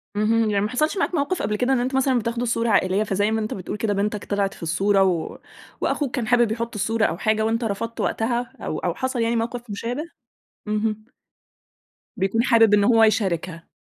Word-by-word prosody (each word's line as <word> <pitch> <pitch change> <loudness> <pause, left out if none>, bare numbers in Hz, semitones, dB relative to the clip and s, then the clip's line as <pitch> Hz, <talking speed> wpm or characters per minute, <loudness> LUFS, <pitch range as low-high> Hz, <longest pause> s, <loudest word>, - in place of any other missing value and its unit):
اهم، 220 +1 +2
يعني 200 -1 +1
ما - - -2
حصَلش 305 +9 0
معاك 375 -2 0
موقف 300 +4 -1
قبل 210 - -1
كده 250 +5 +1
إن 260 - +2
أنت 255 +2 -1
مثلًا 265 -2 +2
بتاخدوا 235 +2 -2
صورة 230 0 0
عائليّة، 200 0 +2
فزي 205 +1 0
ما 220 - 0
أنت 215 - -3
بتقول 195 +2 -5
كده 210 -1 0
بِنتك 205 +1 -2
طلعِت 200 -1 -1
في - - -12
الصورة، 195 +4 +2
و 180 -4 -1 0.4
وأخوك 285 -3 -1
كان 240 -5 -2
حابب 240 -2 +3
يحط 230 0 -3
الصورة 220 +2 +1
أو 165 - -1
حاجة 220 +2 +1
وأنت 230 +2 0
رفضت 225 +2 -3
وقتها، 240 +2 -1
أو - - -3
أو - - -1
حصَل 260 -2 -2
يعني 230 +1 +1
موقف 235 +1 -3
مشابه؟ 235 +8 -3 0.7
اهم. 215 0 -1 1.1
بيكون 195 +4 +1
حابب 225 -4 +5
إن 205 -1 +5
هو 225 +1 +5
يشاركها. 185 -6 0
225 Hz, 200 wpm, -23 LUFS, 205-240 Hz, 1.1 s, حابب